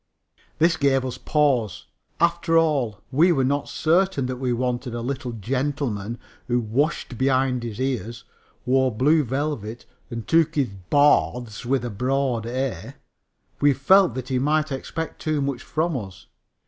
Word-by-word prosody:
This 165 +1 +3
gave 135 -2 +2
us 130 - -5
pause. 135 - +1 0.3
After 170 -1 +2
all, 135 -10 +1
we 160 +7 +4
were 135 -6 +2
not 140 +2 0
certain 170 -3 +1
that 130 0 -3
we 125 -1 -1
wanted 120 0 -2
a 120 - -3
little 130 0 -3
gentleman 120 -1 -2 0.3
who 120 0 +1
washed 125 +2 -1
behind 130 -1 +2
the 115 -3 -5
ears, 120 -2 -4 0.4
wore 130 +1 +3
blue 150 +8 +3
velvet 125 -4 -3 0.2
and 115 -2 -6
took 165 0 +3
his 140 -6 +1 0.2
baths 125 -6 +2
with 130 -1 +1
a 120 - -4
broad 125 +1 -1
"a." 130 +1 -3 0.6
We 145 0 +4
felt 180 - +4
that 130 0 -5
he 130 -1 +1
might 150 +2 +1
expect 160 +4 -5
too 155 -1 0
much 135 -3 -2
from 160 +2 -1
us. 100 -7 -7
130 Hz, 150 wpm, -23 LUFS, 120-150 Hz, 0.6 s, we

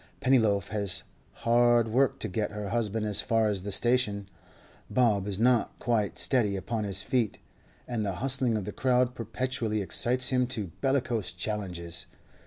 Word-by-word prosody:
Pennyloaf 110 -7 +2
has 100 -3 -2 0.4
hard 120 -1 +4
work 130 +3 +2
to - - -1
get 105 +2 -2
her 105 -1 -5
husband 110 -1 -1
as 105 -2 +2
far 115 -1 +2
as 100 -3 -1
the 100 +2 -5
station; 105 -3 +1 0.6
Bob 105 -6 +2
is 100 -2 -2
not 120 +1 +2
quite 110 -4 0
steady 110 -7 +1
upon 110 +3 -3
his 100 -1 0
feet, 120 -6 0 0.5
and 120 -3 -2
the 100 -2 -1
hustling 125 +2 0
of 100 - -4
the 105 - -4
crowd 125 0 +2
perpetually 115 -1 -2
excites 125 +6 0
him 125 -1 +2
to 110 -8 -4
bellicose 130 -6 0
challenges. 90 -3 -4
110 Hz, 160 wpm, -28 LUFS, 100-125 Hz, 0.6 s, hard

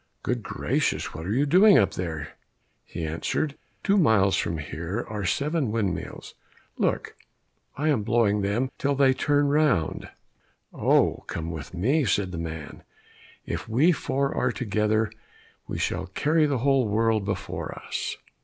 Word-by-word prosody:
"Good - - -1
gracious! - - -1
what 80 +3 -6
are - - -2
you 135 +6 +2
doing 190 +7 +6
up 100 -6 +3
there?" 80 -4 -4 0.5
He 80 - -5
answered, 85 - -2 0.3
"Two 200 0 +3
miles 105 - +4
from 85 - -1
here 85 +9 -4
are 105 -3 -4
seven 140 - 0
windmills; 105 -5 -3 0.5
look, - - -1 0.6
I 150 +3 +1
am 135 -8 +2
blowing 105 -2 +2
them 115 +7 0
till 140 0 +1
they 135 -1 +4
turn 145 +1 +2
round." 145 - +1 0.6
"Oh, - - +3
come 85 0 -4
with 80 +2 -7
me," 135 - +2
said 95 -2 +1
the 85 - -5
man. 80 -3 -6 0.6
"If - - -5
we 140 +11 +4
four 140 -3 -1
are 125 - +1
together, 110 -2 0 0.6
we - - -4
shall - - -2
carry 155 +1 +2
the 140 -2 0
whole 135 -4 +3
world 110 0 +2
before 100 0 -4
us!" - - -3
110 Hz, 150 wpm, -26 LUFS, 95-140 Hz, 0.6 s, doing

